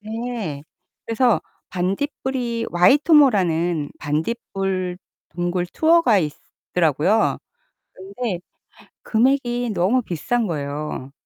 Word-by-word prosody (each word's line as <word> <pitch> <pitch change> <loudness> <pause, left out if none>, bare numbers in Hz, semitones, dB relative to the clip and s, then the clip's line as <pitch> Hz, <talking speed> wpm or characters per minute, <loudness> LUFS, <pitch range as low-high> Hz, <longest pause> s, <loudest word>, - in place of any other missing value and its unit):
네. 220 -8 -5 0.4
그래서 230 0 +2 0.3
반딧불이 235 +5 -2
와이토모라는 180 - +4
반딧불 185 +3 -2 0.3
동굴 175 +1 -2
투어가 315 - +3
있더라고요. 160 +4 0 0.6
근데 195 +1 -5 0.6
금액이 245 0 +1
너무 195 +8 +2
비싼 225 +4 -1
거예요. 145 -3 -4
195 Hz, 210 characters per minute, -22 LUFS, 175-240 Hz, 0.6 s, 와이토모라는